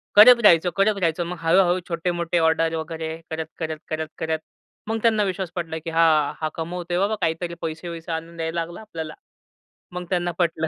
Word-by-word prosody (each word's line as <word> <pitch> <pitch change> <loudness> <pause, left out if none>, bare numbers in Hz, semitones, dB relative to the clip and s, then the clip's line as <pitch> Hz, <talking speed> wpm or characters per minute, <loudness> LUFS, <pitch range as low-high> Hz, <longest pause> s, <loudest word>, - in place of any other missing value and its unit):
करत 235 +3 +9
राहायचं, 175 -3 +6
करत 200 +1 +3
राहायचं. 170 -1 +1
मग 175 +1 -5
हळू-हळू, 175 +2 +4
छोटे-मोठे 170 0 -1
ऑर्डर 160 0 +2
वगैरे 160 0 -4 0.2
करत, 160 0 -3
करत, 160 -1 -3
करत, 160 0 -2
करत. 160 0 -1 0.5
मग 225 +1 0
त्यांना 220 -2 +3
विश्वास 190 -2 -2
पटला 165 -2 -3
की, 165 +1 -6
"हां, 160 -3 +4
हा 155 - 0
कमवतो 175 +2 -4
आहे, 175 - +2
बाबा 205 +3 +1
काहीतरी 165 +2 -1
पैसे-वसे 165 +1 -5
आणून 165 +1 -5
द्यायला 165 +1 -2
लागला 170 +5 -7
आपल्याला.' 165 -8 -6 0.8
मग 180 0 -5
त्यांना 175 -1 0
पटलं 165 -2 +1
170 Hz, 180 wpm, -23 LUFS, 160-180 Hz, 0.8 s, करत